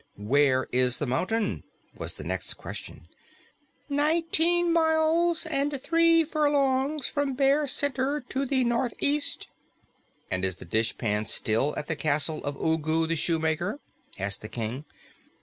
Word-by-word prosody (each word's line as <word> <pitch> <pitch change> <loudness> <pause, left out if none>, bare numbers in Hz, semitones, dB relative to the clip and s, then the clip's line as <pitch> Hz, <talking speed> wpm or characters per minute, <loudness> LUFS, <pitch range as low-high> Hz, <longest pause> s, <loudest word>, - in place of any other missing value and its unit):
"Where 130 +5 +2
is 125 0 +2
the 145 - -2
mountain?" 195 - -1 0.3
was - - -4
the - - -8
next - - -4
question. - - -9 0.8
"Nineteen 330 +3 +2
miles 325 +1 +2
and 285 -2 -1
three 330 +2 +3
furlongs 290 -2 +1
from 285 -2 -1
Bear 280 +2 +2
Center 275 +1 +1
to 270 +1 -2
the 260 -1 +2
northeast." 255 +5 0 0.8
"And 90 0 +1
is 95 -1 +1
the - - -11
dishpan 110 -1 -1
still 115 +7 +1
at - - -3
the 160 - +2
castle 155 +1 0
of 145 - -3
Ugu 160 0 0
the 165 +1 -1
Shoemaker?" 165 - -1 0.4
asked 100 0 -2
the 110 - -7
King. 120 +5 -5
250 Hz, 130 wpm, -27 LUFS, -, 0.8 s, three